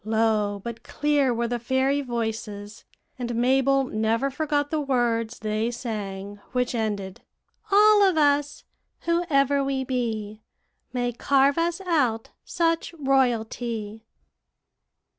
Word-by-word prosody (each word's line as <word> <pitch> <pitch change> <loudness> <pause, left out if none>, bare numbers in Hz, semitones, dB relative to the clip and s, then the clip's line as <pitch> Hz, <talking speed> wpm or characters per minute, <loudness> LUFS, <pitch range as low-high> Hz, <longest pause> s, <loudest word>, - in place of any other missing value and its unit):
Low 215 -2 +1
but 235 -1 -6
clear 290 -2 +1
were 235 0 -1
the 240 0 -2
fairy 260 +4 +1
voices; 220 -4 -5 0.3
and 240 -1 -3
Mabel 270 +3 +3
never 225 +3 0
forgot 290 0 -1
the 310 -1 0
words 240 -4 0
they 215 +1 -1
sang, 205 -4 -5
which 250 -1 0
ended, 205 -5 -3 0.5
'All 420 +1 +6
of 380 -4 +4
us, 290 -1 +2 0.4
whoe'er 285 -5 +2
we 270 -1 -1
be, 220 -5 -3 0.5
May 245 -1 -1
carve 275 +4 +2
us 340 +2 0
out 270 -12 0
such 330 0 -1
royalty.'" 235 -5 -1
245 Hz, 115 wpm, -25 LUFS, 220-285 Hz, 0.5 s, All